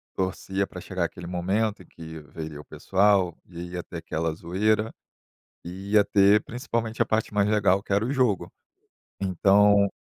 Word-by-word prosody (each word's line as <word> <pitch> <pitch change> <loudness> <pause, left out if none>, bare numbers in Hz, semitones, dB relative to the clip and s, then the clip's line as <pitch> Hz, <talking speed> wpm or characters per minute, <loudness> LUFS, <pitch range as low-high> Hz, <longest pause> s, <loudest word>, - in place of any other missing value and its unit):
torcia 95 +1 -2
pra 90 - -9
chegar 90 -1 -2
aquele 85 +1 -7
momento 95 +4 -1
em - - -21
que 80 -1 -10
veria 80 0 -8
o 75 - -11
pessoal 95 -3 +2
e 85 0 -8
ia 90 -1 -4
ter 85 - -8
aquela 80 0 -2
zoeira 105 +7 0 0.7
e 95 +3 -8
ia 105 -1 +6
ter 100 +1 +5
principalmente 115 -1 -3
a - - +4
parte 110 -1 -1
mais 100 -1 +2
legal 100 -3 +3
que - - -10
era 100 +2 +2
o 125 - -2
jogo. 125 -8 +1 0.7
Então 100 +2 +4
95 Hz, 170 wpm, -26 LUFS, 85-105 Hz, 0.7 s, ia